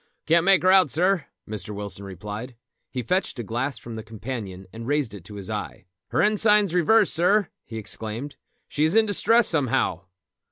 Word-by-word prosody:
"Can't 165 +2 +3
make 190 -4 +5
her 185 - +5
out, 190 -5 +6
sir," 180 -1 +1 0.2
Mr. 105 -1 -6
Wilson 100 -1 -6
replied. 105 +6 -7 0.3
He 125 -2 -4
fetched 180 - 0
a 120 - -3
glass 120 +6 -2
from 115 -1 -8
the - - -4
companion 110 -4 -7
and 115 +1 -7
raised 145 -5 0
it 100 -4 -9
to 105 - -10
his 100 -2 -7
eye. - - -5 0.2
"Her - - +1
ensign's 210 -3 +3
reversed, 200 +4 +4
sir," 185 +3 +3 0.2
he 115 - -7
exclaimed. 110 +6 -5 0.3
"She 150 - -1
is 160 +5 +2
in 225 0 +6
distress 225 +2 +3
somehow." 115 - 0
130 Hz, 185 wpm, -25 LUFS, -, 0.3 s, out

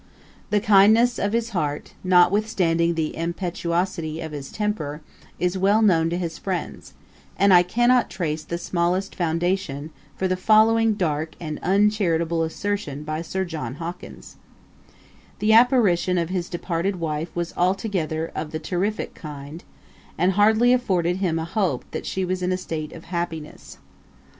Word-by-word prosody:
The 210 - +2
kindness 220 +3 +5
of 200 - 0
his 230 +1 0
heart, 150 -6 -3
notwithstanding 180 -2 +3
the 160 -1 -2
impetuosity 170 -1 -2
of 160 -1 -6
his 145 -2 -7
temper, 160 -9 -3 0.4
is 180 +2 -1
well 205 +4 +3
known 165 -5 +3
to 170 - -2
his 170 -2 -4
friends; 185 -3 -5 0.4
and 200 -1 +5
I 175 - +8
cannot 240 +7 +2
trace 155 -4 -3
the 170 - -4
smallest 175 +3 -1
foundation 165 -3 -1 0.3
for 190 - 0
the 185 - 0
following 220 +3 +4
dark 160 -4 -2
and 155 -3 -5
uncharitable 180 -4 +2
assertion 160 -3 -3
by 155 +1 -3
Sir 190 +3 -3
John 150 -8 -5
Hawkins: 170 +3 -8 1.0
'The 215 +2 +2
apparition 220 -7 +4
of 170 -1 -1
his 180 -2 -3
departed 175 +2 -2
wife 160 -1 -3
was 175 -1 -3
altogether 180 -4 -1
of 155 - -4
the 155 - -4
terrifick 190 +6 -2
kind, 150 +1 -9 0.5
and 180 +2 +3
hardly 220 +5 +4
afforded 180 -8 +1
him 180 -4 0
a 160 - -2
hope 170 - -1
that - - -5
she 190 -1 -1
was 185 0 -2
in 180 0 0
a 185 - +1
state 160 -4 -5
of 165 - -11
happiness.' 170 -3 -6
175 Hz, 150 wpm, -23 LUFS, 165-200 Hz, 1.0 s, I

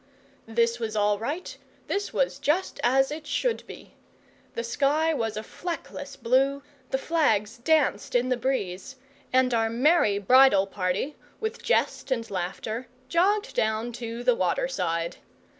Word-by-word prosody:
This 230 +1 +1
was 220 -2 -3
all 205 -1 +2
right; 295 +10 -4 0.3
this 405 +1 -2
was - - 0
just 340 +6 0
as 270 +3 +3
it 305 0 -6
should 470 +9 0
be. - - -12 0.6
The 230 - -2
sky 290 +7 +1
was 225 -6 -2
a 215 - -3
fleckless 290 -2 -6
blue, 270 +3 +1 0.3
the 265 - +1
flags 235 -8 +1
danced 305 +1 +1
in 245 +1 +2
the 255 - +2
breeze, 245 -2 -3 0.4
and 255 -1 +3
our 225 -1 +2
merry 245 -3 +3
bridal 225 -1 +6
party, 195 +8 -2 0.2
with 440 0 -4
jest - - 0
and 230 -3 -1
laughter, 200 +6 -4 0.2
jogged 410 - +2
down 220 +2 0
to 235 0 -6
the 250 0 +4
water 185 +3 0
side. 170 -9 -2
245 Hz, 145 wpm, -26 LUFS, 220-290 Hz, 0.6 s, bridal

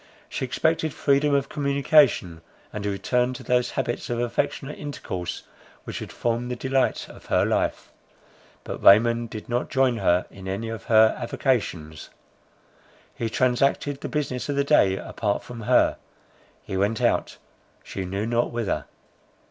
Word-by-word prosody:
She - - -3
expected 160 +4 0
freedom 140 +1 +2
of 140 -1 +1
communication, 140 - +2 0.3
and 105 - -4
a 105 - -1
return 125 +5 0
to - - -8
those 125 0 +1
habits 120 - -2
of 120 -1 -1
affectionate 120 +4 -2
intercourse 95 - -5 0.4
which - - -6
had - - -7
formed 120 +1 -2
the 125 - -2
delight 130 +2 0
of - - -14
her - - +3
life. - - -1 0.7
But - - -6
Raymond 115 +3 +5
did 110 -1 -8
not 120 0 -1
join 130 -3 +2
her 90 -4 +2
in 95 -1 -10
any 100 +4 -3
of 115 -3 -6
her 110 -1 +5
avocations. 90 - -2 1.0
He 115 - -3
transacted 135 +4 +1
the - - -4
business 145 -3 -2
of 145 - 0
the 140 - +2
day 100 -10 +4
apart 100 0 -2
from 120 -2 -9
her; 125 +3 +3 0.7
he 95 - -5
went 100 +4 +1
out, - - 0 0.5
she 95 - -5
knew 95 +3 -3
not 120 +1 +1
whither. 115 -3 -2
120 Hz, 155 wpm, -25 LUFS, 105-135 Hz, 1.0 s, Raymond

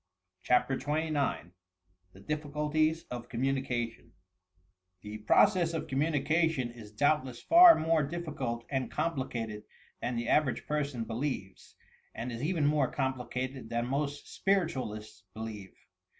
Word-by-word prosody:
CHAPTER 125 +2 +2
XXIX 150 - -1 0.6
THE 95 - -15
DIFFICULTIES 150 +4 0
OF 120 -1 -6
COMMUNICATION 125 -2 -2 0.9
The 105 +1 -7
process 170 - +4
of 160 - -2
communication 150 -1 +1
is 110 -3 -12
doubtless 130 +1 +1
far 340 0 +9
more 160 0 +2
diffi 160 +1 -5
cult 120 -3 -3
and 130 -2 -1
complicated 130 -9 -3 0.4
than 125 - -2
the 115 0 -2
average 145 -2 +2
person 140 -6 -2
belieres, 115 -4 -4 0.4
and 120 +3 -4
is 115 0 -5
even 155 0 0
more 145 -3 +2
complicated 130 -2 -3
than 120 0 -1
most 140 +2 -2 0.2
spiritaaUsts 135 - -1
believe. 110 -3 -7
135 Hz, 120 wpm, -31 LUFS, 120-155 Hz, 0.9 s, far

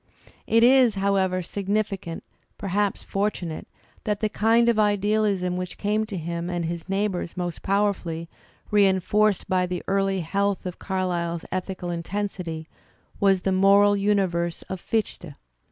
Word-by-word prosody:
It 230 0 +4
is, 250 -3 +6
however, 190 -2 +1
significant, 200 -2 -3 0.3
perhaps 200 0 -1
fortunate, 195 -5 -3 0.4
that 210 -1 -1
the 215 - 0
kind 225 +3 +3
of 235 -2 +3
idealism 205 -3 +1
which 180 0 -5
came 215 +1 0
to 200 -3 -5
him 170 +1 -4
and 175 -1 -2
his 170 +2 -5
neigh 200 +2 +1
bours 180 -3 -5
most 175 -2 -3
powerfully, 190 -5 0 0.4
reinforced 205 0 +3
by 185 -1 +1
the 180 -1 -4
early 195 -1 +1
health 200 +4 -1
of 180 -1 -5
^ - - -46
Carlyle's 175 -3 -2
ethical 185 -1 -3
intensity, 175 -2 -4 0.5
was 195 -2 +3
the 190 - +1
moral 200 +2 +5
universe 190 -4 0
of 190 -2 -5
Fichte. 190 -8 -3
195 Hz, 140 wpm, -25 LUFS, 175-205 Hz, 0.5 s, is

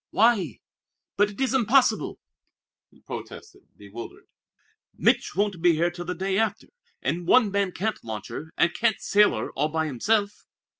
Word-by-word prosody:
"Why? 205 - +2 0.6
But 205 0 +3
it 200 - -12
is 265 -1 +1
impossible!" 260 +1 +2 0.7
he - - -25
protested, 390 -3 -10
bewildered. 105 +3 -10 0.7
"Mich' - - +2
won't 200 -3 0
be 175 0 +5
here 170 +2 +1
till 175 0 -7
the 180 +1 -3
day 190 +3 -1
after 220 -2 -1 0.3
and 170 0 -2
one 230 -3 +5
man 200 -1 0
can't 215 +5 -3
launch 110 -3 -6
her, 160 +1 -7
and 175 - +3
can't 225 -2 +1
sail 210 0 +3
her - - -4
all 150 +3 -1
by 160 0 -1
himself." 200 - -1
195 Hz, 160 wpm, -25 LUFS, 165-220 Hz, 0.7 s, be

